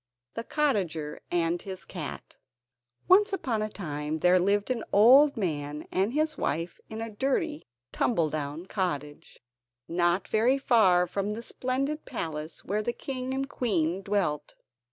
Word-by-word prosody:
The 230 - -4
Cottager 190 - -1
And 170 0 0
His 190 -1 -7
Cat 165 -6 -7 0.7
Once 400 +3 +6
upon 255 - -1
a 215 - -1
time 150 -6 -4
there 180 +3 +4
lived 200 +5 +1
an 235 -3 -1
old 265 +7 +7
man 150 -6 -3
and 195 +4 +1
his 305 +1 0
wife 165 +4 -2
in 220 0 -6
a 225 0 -5
dirty, 285 +6 -1 0.2
tumble 165 -10 +1
down 150 +2 -4
cottage, 150 - -4 0.4
not 175 +2 +1
very 235 +5 +3
far 205 -10 +4
from 200 +3 -2
the 230 - -6
splendid 275 +6 -2
palace 160 -8 -5
where 210 +3 0
the 240 +3 -2
king 260 -1 -4
and 270 +1 -1
queen 190 - 0
dwelt. 185 -8 -1
200 Hz, 145 wpm, -28 LUFS, 165-255 Hz, 0.7 s, old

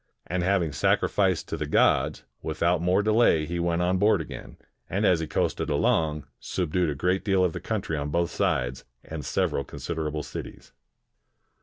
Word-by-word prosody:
And 90 0 -2
having 90 -3 +1
sacrificed - - +1
to - - -3
the - - -3
gods, - - +2 0.2
without 85 +2 0
more 90 +3 +2
delay 110 -7 +4
he 85 +2 -3
went 85 0 +1
on 90 +1 +1
board 105 +3 +4
again, - - -8 0.3
and 100 +4 0
as 90 -4 +4
he 80 - -3
coasted - - -1
along, 75 -2 +1
subdued 90 -1 -1
a 75 - -2
great 90 +6 0
deal 95 -3 +2
of 90 -3 +1
the - - -4
country 80 - -2
on 75 -1 -3
both 85 +2 0
sides, 60 0 -1 0.2
and 80 -2 -6
several 70 - 0
consider 80 +3 -4
able 75 0 -3
cities. - - -9
85 Hz, 175 wpm, -26 LUFS, 75-90 Hz, 0.3 s, delay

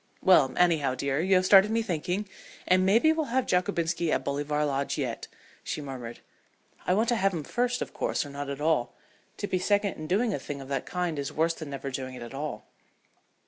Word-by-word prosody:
"Well, 150 -8 +6
anyhow, 160 -7 +3
dear, 140 +1 -1
you 190 +2 +3
have 185 0 +3
started 195 +1 +7
me 225 +1 +1
thinking, 180 +2 -2 0.4
and 185 +1 +4
maybe 230 +12 +4
we'll 320 -1 -1
have 260 +1 0
Jockobinski 175 -3 0
at - - 0
Bolivar 145 +1 -1
Lodge 140 -1 -1
yet," - - -3 0.4
she - - -4
murmured. 130 -5 -7 0.7
"I 180 - +3
want 220 +3 +2
to 240 - +3
have 195 -2 +1
him 160 - -3
first, 245 - -1
of - - -12
course, - - -1
or 145 - -9
not 140 0 -5
at 140 0 -4
all. 150 -6 +1 0.4
To - - -3
be 185 -2 -1
second 205 +1 +1
in 155 - -6
doing 215 +5 +1
a - - -2
thing 140 +1 -6
of 135 0 -9
that 135 -2 -2
kind 175 -4 -2
is 140 - -3
worse 165 +2 +1
than 155 -3 -8
never 140 0 -5
doing 130 0 -5
it 125 - -8
at 120 - -9
all." 145 +2 -5
165 Hz, 220 wpm, -28 LUFS, 140-195 Hz, 0.7 s, started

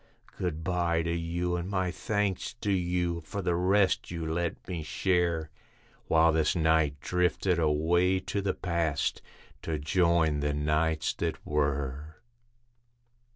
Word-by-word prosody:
Good 80 -3 -3
bye 85 -1 +1
to 85 0 -1
you, 85 +1 -1
and 90 +1 -3
my 95 -2 0
thanks 105 +1 -2
to 105 - 0
you, 90 -2 0
for 100 +5 -5
the 90 -1 +1
rest 95 +3 +2
you 85 -2 -4
let 85 +1 -3
me 90 -3 -3
share, 85 -1 0 0.6
While 80 0 +5
this 80 0 +1
night 80 -3 +2
drifted 90 0 +1
away 85 +4 +2
to 100 - -2
the 95 -1 -1
Past, 85 -5 -1 0.4
to 80 -1 -2
join 80 -1 +2
the 75 0 -1
Nights 75 +1 +1
that 85 -2 -2
Were. 70 0 -1
85 Hz, 135 wpm, -29 LUFS, 80-90 Hz, 0.6 s, While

